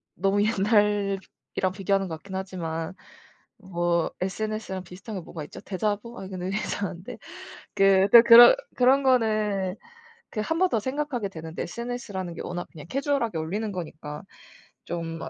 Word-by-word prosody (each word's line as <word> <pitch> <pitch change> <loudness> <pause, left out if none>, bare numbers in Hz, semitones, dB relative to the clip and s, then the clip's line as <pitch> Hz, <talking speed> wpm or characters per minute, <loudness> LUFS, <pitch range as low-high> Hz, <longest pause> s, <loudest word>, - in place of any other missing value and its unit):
너무 195 +2 +1
옛날이랑 205 -1 +2 0.5
비교하는 195 0 0
것 160 - -4
같긴 190 +4 -9
하지만 170 -4 -4 0.6
뭐 175 -4 -1
SNS랑 210 0 -3
비슷한 190 +5 -9
게 185 - -4
뭐가 160 -1 -8
있죠? - - -11
대자보? 210 +4 -3
아니, 190 - -7
근데 185 -1 -5
이거 195 - -1
이상한데. 190 -3 -4 0.6
그 195 0 +5
그러니까 235 - +11
그런 240 - +10 0.2
그런 260 +2 +4
거는 215 -7 +2 0.6
그 215 - -2
1 325 +10 -1
번 370 - +4
더 225 - +1
생각하게 260 -3 -2
되는데 160 -2 -6
SNS라는 210 -5 -5
게 - - -6
워낙 175 0 -5
그냥 150 -1 -9
캐주얼하게 275 - 0
올리는 205 +7 -3
거니까 155 -5 -7 0.6
좀 165 -1 -5
어 - - -5
195 Hz, 335 characters per minute, -26 LUFS, 180-220 Hz, 0.6 s, 그러니까